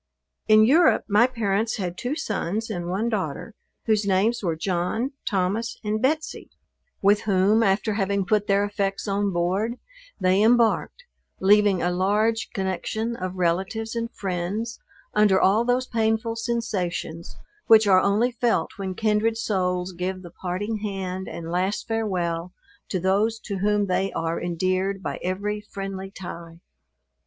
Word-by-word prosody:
In 215 0 +7
Europe 315 +8 +5
my 215 +4 +5
parents 225 -3 -1
had 180 -4 -3
two 250 +8 -3
sons 220 - -2
and 175 -4 -4
one 200 +6 -1
daughter, 200 -2 -3 0.3
whose 215 -2 +2
names 200 +4 +1
were 170 -5 -1
John, 185 - -1 0.2
Thomas 200 +3 -1
and 215 0 -1
Betsey; 310 +5 -1 0.5
with 205 +1 +4
whom, 200 +3 +4
after 205 +1 +2
having 200 -1 0
put 210 +1 +1
their 200 0 +3
effects 200 0 -2
on 200 0 0
board, 190 +7 0 0.4
they 185 +2 +3
embarked, 235 - +2 0.4
leaving 205 -1 +4
a 175 - +1
large 210 +5 +1
connexion 210 +4 -2
of 185 -3 -5
relatives 190 +6 -1
and 230 0 -3
friends, 195 +5 -3 0.3
under 210 -3 +4
all 205 +5 +4
those 245 +1 +1
painful 225 -1 0
sensations, 205 -8 -3 0.3
which 220 -2 +7
are 190 -2 +6
only 215 +5 +2
felt 240 -1 0
when 190 -2 -4
kindred 220 +1 +1
souls 180 -4 -1
give 185 +1 -4
the 175 - -10
parting 190 +5 -3
hand 190 -3 -4
and 165 0 -6
last 185 +3 -1
farewell 180 -6 -2 0.4
to 185 - -1
those 200 +5 +1
to 200 -2 -5
whom 205 +1 +2
they 195 0 0
are 165 0 -2
endeared 185 +3 -1
by - - -4
every 205 +3 -2
friendly 195 -2 -6
tie. 170 -3 -9
200 Hz, 145 wpm, -24 LUFS, 185-220 Hz, 0.5 s, In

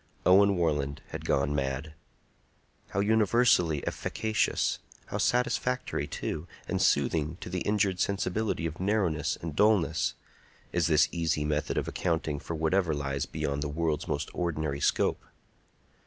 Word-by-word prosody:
Owen 100 +1 +6
Warland 75 -4 0
had - - -6
gone 70 +1 +1
mad! 70 +2 -2 1.0
How 100 - 0
universally 105 - +3
efficacious—how 110 -1 -2
satisfactory, 125 +1 0
too, 80 +2 -4 0.2
and - - -1
soothing 75 +3 +2
to - - -7
the 90 - -1
injured 100 -3 +1
sensibility 100 -2 -1
of 80 0 -4
narrowness 95 -5 0
and 80 -3 -4
dulness—is 85 -3 0
this 75 -2 +4
easy 80 -3 0
method 75 0 -1
of - - -1
accounting 80 -4 -1
for 85 - -5
whatever 80 +1 +1
lies 70 -1 -2
beyond 70 0 -2
the 75 - -2
world's 80 0 -1
most - - -2
ordinary 80 -5 -2
scope! - - +1
80 Hz, 125 wpm, -29 LUFS, 75-100 Hz, 1.0 s, Owen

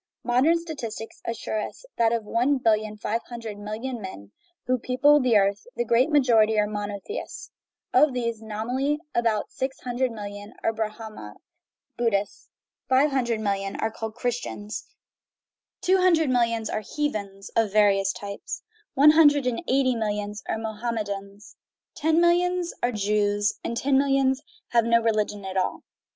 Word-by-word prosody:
Modern 260 +8 +3
statistics 245 -10 -7
assure 230 -1 -3
us - - -8
that 230 -1 +3
of 230 -1 0
the 210 - -14
one 255 +5 +2
billion 215 -3 +1
five 220 +2 -2
hundred 230 -4 -7
million 220 +4 -5
men 100 - -9 0.3
who 255 0 +1
people 285 +5 +4
the 245 -4 +4
earth 200 0 +1
the 240 - -1
great 235 +5 +3
majority 230 -7 +4
are 210 - +3
monotheists; 205 - -5 0.4
of 300 - +5
these, 235 -3 -2
nominally, 245 +7 -1 0.2
about 230 -3 0
six 265 0 -3
hundred 250 +1 -1
millions 205 -1 -8
are 225 - +1
Brahma 215 - -6 0.6
Buddhists, 205 -4 -1 0.4
five 270 +3 +4
hundred 240 -4 0
millions 195 -1 -2
are 220 - 0
called 220 0 -6
Christians, 240 -4 -4 0.9
two 375 +1 +4
hundred 335 -6 +3
millions 230 -2 +1
are 215 - -2
heathens 205 -7 -4
(of 225 -3 +2
various 200 -2 +4
types), 200 0 -7 0.3
one 290 +3 +8
hundred 290 -3 +5
and 250 +2 -1
eighty 260 -1 +3
millions 210 -1 -2
are - - 0
Mohammedans, 210 -3 -5 0.4
ten 320 +2 +2
millions 350 0 +2
are 245 - +1
Jews, 205 -1 +1
and 235 - -3
ten 270 +2 +3
millions 270 -1 +2 0.3
have 235 -1 +3
no 230 0 +4
re 230 0 +2
ligion 210 -2 -2
at 190 0 -4
all. 185 - -1
230 Hz, 150 wpm, -25 LUFS, 210-260 Hz, 0.9 s, one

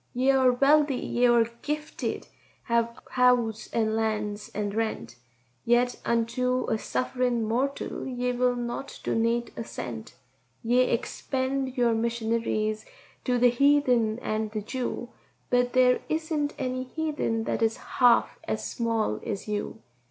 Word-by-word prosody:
"Ye 260 +2 +3
are 260 -2 +4
wealthy, 285 +2 +4
ye 245 0 +1
are 235 -1 +5 0.2
gifted, 300 +1 -3
ye - - -27 0.3
have 235 0 0
house 250 -3 +2
and 220 -1 +1
lands 210 -2 -2
and 205 -1 -2
rent, 220 - -3 0.5
Yet 245 +1 +2
unto 250 +2 0
a 220 - +1
suff'rin' 250 -1 -1
mortal 255 +7 -2
ye 250 -1 -1
will 250 0 +1
not 240 +3 -5
donate 230 +1 0
a - - -4
cent; 115 - -7 0.5
Ye 240 +2 +3
expend 260 +2 -1
your 240 -2 +3
missionaries 225 -1 -1 0.4
to 250 -2 +2
the 245 0 +5
heathen 250 -4 +3
and 215 0 -1
the 215 0 -4
Jew, 245 +1 -4 0.4
But 245 0 +2
there 250 -1 +5
isn't 310 -2 -1
any 255 -1 -2
heathen 290 -6 -2
that - - -2
is 225 0 +2
half 245 -2 +3
as - - -2
small 225 - -1
as 200 0 -4
you. 205 - -4
240 Hz, 135 wpm, -27 LUFS, 225-255 Hz, 0.5 s, are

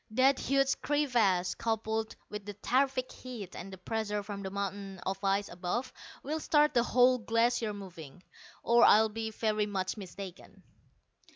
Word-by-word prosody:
That 260 +4 +3
huge 275 0 +1
crevasse, 230 -12 +2
coupled 220 -1 -2
with 210 -1 -6
the 205 0 -7
terrific 255 +4 0
heat 230 -8 -8
and 195 +2 -7
the 190 - -8
pressure 210 +1 -2
from 200 -1 -6
the 190 - -4
mountain 200 0 -4
of 195 +1 -3
ice 195 +1 +1
above, 185 +9 -3 0.3
will 310 +3 -2
start 300 -1 +3
the 240 - +4
whole 250 +1 +4
Glacier 230 0 +1
moving, 180 -5 -10 0.4
or 235 0 +5
I'll 220 +1 +7
be 220 +1 -4
very 215 -1 0
much 190 0 -2
mistaken." 190 -1 -9
215 Hz, 155 wpm, -31 LUFS, 195-245 Hz, 0.4 s, I'll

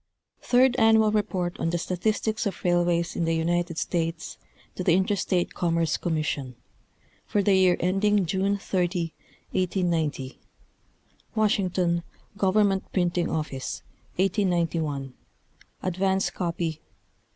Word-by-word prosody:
G. - - -18
Third 250 0 +5
Annual 220 -1 +5
Report 190 -5 -1
on 165 - 0
the 175 - 0
Statistics 215 +5 -1
of 195 - -6
Railways 175 -1 +1
in 170 - 0
the 165 0 +1
United 170 +1 0
States 165 -1 -2 0.3
to 185 - -4
the 175 -1 +4
Interstate 190 -1 0
Commerce 165 -2 +1
Commission, 150 -6 -2 0.7
for 205 - +1
the 200 - +4
year 185 -2 +4
ending 195 +2 +2
Jane 195 +3 0
30, 175 -3 -1 0.4
1890: 170 -7 -1 1.0
Washington, 185 -5 +1 0.3
Government 195 0 +2
Printing 175 -2 0
Office, 150 -4 -4 0.3
1891 170 -8 0 0.7
(advance 190 +1 0
copy, 170 -2 -2
pp. 155 - -13
180 Hz, 115 wpm, -26 LUFS, 165-195 Hz, 1.0 s, Third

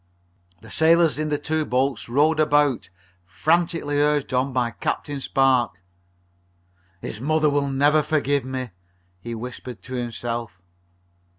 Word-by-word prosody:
The 110 0 -13
sailors 160 -3 +4
in 155 0 -1
the 150 - 0
two 155 +2 -1
boats 125 -4 -1
rowed 150 +5 +3
about, 145 -6 +2 0.3
frantically 160 - 0
urged 150 -2 +1
on 130 +2 +1
by 125 -2 0
Captain 145 +4 -3
Spark. 130 -8 +2 1.2
"His 110 - -6
mother 155 +1 +2
will 140 -1 0
never 145 +3 +3
forgive 145 -2 0
me!" 130 -2 -5 0.5
he 115 +5 -6
whispered 120 -3 -8
to 130 - -8
himself. 120 -4 -4
135 Hz, 125 wpm, -23 LUFS, 120-150 Hz, 1.2 s, sailors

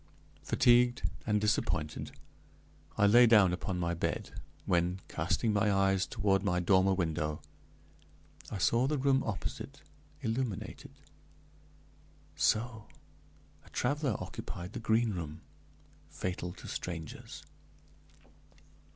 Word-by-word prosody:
Fatigued 125 0 +3 0.2
and 105 -1 +2
disappointed, 100 -7 -1 0.9
I 100 - +4
lay 120 +4 +7
down 105 -6 +6
upon 95 0 -3
my 85 -1 -1
bed, 85 - -3 0.3
when, 90 +1 +1
casting 110 -2 0
my 105 0 +2
eyes 95 -1 +2
toward 95 -1 +1
my 90 -3 +1
dormer 95 +1 +3
window, 75 -4 -1 1.1
I - - -4
saw 115 +7 +2
the 150 +1 0
room 135 0 +3
opposite 110 -4 -5 0.4
illuminated. 115 -2 -3 1.4
So! 110 -1 0 0.8
a - - -18
traveler 140 -2 0
occupied 90 +1 -7
the - - -4
Green 110 0 +2
Room 80 -3 -6 0.7
fatal 90 -1 -4
to - - -11
strangers. 80 -4 -6
100 Hz, 105 wpm, -32 LUFS, 90-115 Hz, 1.4 s, lay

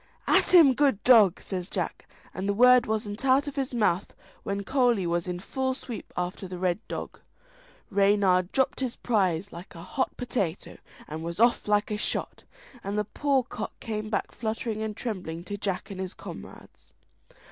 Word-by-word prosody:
"At - - +3
him, 325 -7 +8
good 270 -6 +2
dog!" 215 -8 +6
says 185 -1 -4
Jack, - - -4 0.2
and 190 +2 -3
the 200 - +1
word 250 +2 +6
wasn't 215 0 -3
out 270 +2 +3
of 285 - -5
his 270 -2 -2
mouth 210 -6 0 0.3
when 200 0 -3
Coley 245 -5 +2
was 170 +1 -1
in 180 -1 -3
full 260 +6 -2
sweep 245 -4 -8
after 180 +2 -3
the 180 0 -6
Red 180 +1 0
Dog. - - -6 0.7
Reynard 195 -2 +3
dropped 265 -1 +1
his 255 -3 -2
prize 195 -5 0
like 175 +2 -10
a 165 - -9
hot 260 - -2
potato, 200 -9 -3 0.3
and 155 +1 -6
was 170 +3 -5
off 235 -1 +3
like 210 0 +2
shot, - - -3 0.4
and 200 +1 -3
the 210 - 0
poor 275 +4 +1
cock - - -7
came 215 -2 -4
back 205 - -2
fluttering 220 -1 -3
and 215 -1 -4
trembling 180 -8 -5
to 205 +3 -5
Jack 195 0 -3
and 190 - -7
his 190 -1 -5
comrades. - - -11
210 Hz, 175 wpm, -27 LUFS, 185-245 Hz, 0.7 s, him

